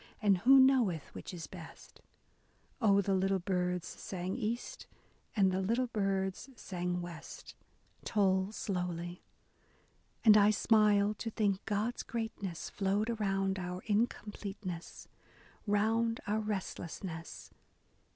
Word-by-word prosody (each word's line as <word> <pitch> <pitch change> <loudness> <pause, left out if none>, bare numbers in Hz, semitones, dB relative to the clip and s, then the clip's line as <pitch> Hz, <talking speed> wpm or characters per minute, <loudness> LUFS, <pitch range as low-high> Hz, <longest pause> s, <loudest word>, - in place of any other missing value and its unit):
And 200 -4 +3
who 265 +7 +7
knoweth 245 - +3
which - - -7
is 170 -4 -6
best? 170 -3 -12 0.8
Oh, 200 -3 +5
the 195 0 0
little 190 +1 +2
birds 180 -1 -1
sang 185 0 -5
east, 235 0 -4 0.5
and 195 -3 +4
the 185 +1 0
little 230 +6 +1
birds 195 0 -1
sang 180 -4 -3
west, 170 -2 -9 0.5
Toll 190 -2 +2
slowly. 180 -4 -3 1.0
And 215 -1 +9
I 205 0 +6
smiled 210 -1 +3
to 230 - -3
think 205 -3 0
God's 215 +3 -1
greatness 220 -7 -4
flowed 205 +3 0
around 195 -3 0
our 180 0 -5
incompleteness, 205 -4 -3 0.3
— - - -26 0.3
Round 225 +3 +2
our 210 +2 0
restlessness. 185 -5 -5
200 Hz, 115 wpm, -33 LUFS, 185-215 Hz, 1.0 s, And